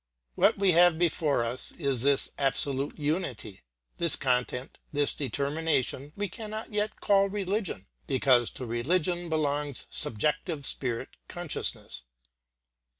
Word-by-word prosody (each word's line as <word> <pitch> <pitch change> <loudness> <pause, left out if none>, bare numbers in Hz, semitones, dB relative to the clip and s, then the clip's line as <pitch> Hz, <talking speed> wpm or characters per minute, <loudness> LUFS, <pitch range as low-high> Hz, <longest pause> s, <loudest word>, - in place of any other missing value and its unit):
What - - +4
we 195 -1 +4
have 175 -1 +6
before 155 -6 +2
us 120 +2 -2
is 140 -7 -1
this 140 +1 +2
absolute 140 0 +1
unity. 145 - -3 0.4
This 170 -2 +1
content, 125 -1 -1
this 145 -1 +1
determination 140 +1 -1
we 205 0 -1
cannot 215 +3 -6
yet 210 +1 -1
call 200 -1 +3
religion 195 - -2 0.2
because 130 -3 +4
to 130 - -4
religion 170 +9 0
belongs 145 -3 -1
subjective 150 - -1
spirit 120 -4 -1 0.2
consciousness. - - -2
145 Hz, 115 wpm, -29 LUFS, 130-175 Hz, 0.4 s, have